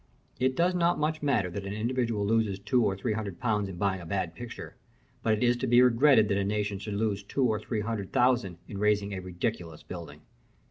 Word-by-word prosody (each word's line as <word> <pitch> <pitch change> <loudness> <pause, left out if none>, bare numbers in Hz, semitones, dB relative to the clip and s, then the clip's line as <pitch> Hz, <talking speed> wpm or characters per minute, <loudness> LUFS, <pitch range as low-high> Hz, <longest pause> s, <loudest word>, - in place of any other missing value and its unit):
It 130 +1 +1
does 175 +4 +2
not 175 -1 +2
much 155 +1 -1
matter 120 -11 +1
that 100 +3 -5
an 100 +1 -5
individual 115 -2 -1
loses 110 -2 +1
two 115 +5 +1
or 95 -3 0
three 110 +3 -1
hundred 105 -4 -5
pounds 105 -5 0
in 95 - -7
buying 95 0 0
a - - -9
bad 90 -2 -2
picture, 115 +7 -8 0.5
but 110 - +2
it 110 - 0
is 120 0 +4
to 130 - -2
be 120 0 +5
regretted 125 -2 +5
that 100 -1 +1
a - - +1
nation 105 0 -1
should 100 0 -5
lose 105 -1 0
two 130 +7 -2
or 110 -3 +1
three 110 -3 -3
hundred 105 -3 -4
thousand 120 -8 +2
in 100 - -6
raising 105 -1 +1
a 95 - -3
ridiculous 90 -3 -4
building. 80 -4 -9
105 Hz, 225 wpm, -28 LUFS, 100-120 Hz, 0.5 s, be